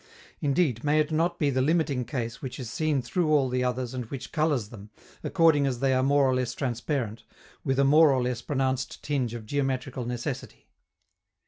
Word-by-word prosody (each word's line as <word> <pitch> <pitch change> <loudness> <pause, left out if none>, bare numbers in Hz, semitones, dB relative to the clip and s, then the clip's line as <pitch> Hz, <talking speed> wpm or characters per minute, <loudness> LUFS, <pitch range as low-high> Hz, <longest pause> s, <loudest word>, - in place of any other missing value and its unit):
Indeed, 140 -5 +1
may 150 +1 +3
it 155 +1 +1
not 170 +2 +1
be 145 -4 +1
the 130 0 +1
limiting 145 -4 +1
case 120 -3 -4
which 130 0 -6
is 125 -3 -6
seen 150 0 0
through 175 +1 0
all 140 -4 +3
the 125 0 0
others 125 0 -2
and 125 -2 -4
which 130 +3 -7
colors 150 -9 0
them, 105 -2 -11 0.3
accordingly 150 -4 +3
as 125 -2 -4
they 135 0 +2
are 130 - +2
more 140 +1 +3
or 130 - +2
less 125 -1 -1
transparent, 120 -3 -2 0.4
with 135 0 0
a 140 - +4
more 150 +2 +6
or 130 -2 +1
less 125 -1 -2
pronounced 130 -2 -2
tinge 130 -5 -1
of 115 -2 -7
geometrical 130 -1 -2
necessity? 120 0 -5
130 Hz, 195 wpm, -27 LUFS, 125-145 Hz, 0.4 s, more